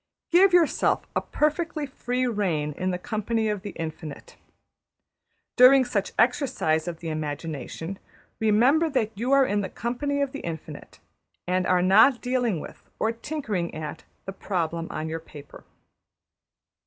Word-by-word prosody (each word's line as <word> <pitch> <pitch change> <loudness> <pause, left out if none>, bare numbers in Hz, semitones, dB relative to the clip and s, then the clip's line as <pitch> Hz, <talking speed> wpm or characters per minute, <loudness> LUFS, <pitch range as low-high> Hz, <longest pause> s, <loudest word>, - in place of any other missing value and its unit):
Give 370 +3 +6
yourself 350 -3 +3
a - - +2
perfectly 305 0 -1
free 255 -2 -2
rein 185 -10 -1
in 185 +5 -3
the 180 - -1
company 220 +3 -1
of 210 -2 -2
the 205 - -6
Infinite. 160 -2 -7 1.2
During 260 +1 +7
such 205 -5 -2
exercise 235 - +1
of 170 -2 -5
the 165 - -4
imagination, 155 +3 -5 0.4
remember 250 +10 +3
that 225 -6 -1
you 240 +6 -2
are 275 -1 +6
in 205 -3 0
the 190 - -4
company 285 +5 -2
of 275 - -3
the 280 - -6
Infinite, 165 -2 -8 0.5
and 185 0 +1
are 180 -1 +3
not 220 +7 +6
dealing 245 -7 0
with, - - -11
or 220 - +1
tinkering 230 - -4
at, 155 -1 -6 0.2
the 195 - -5
problem 170 -4 -2
on 155 +1 -4
your 160 +1 -3
paper. 145 -3 -13
210 Hz, 145 wpm, -25 LUFS, 165-255 Hz, 1.2 s, During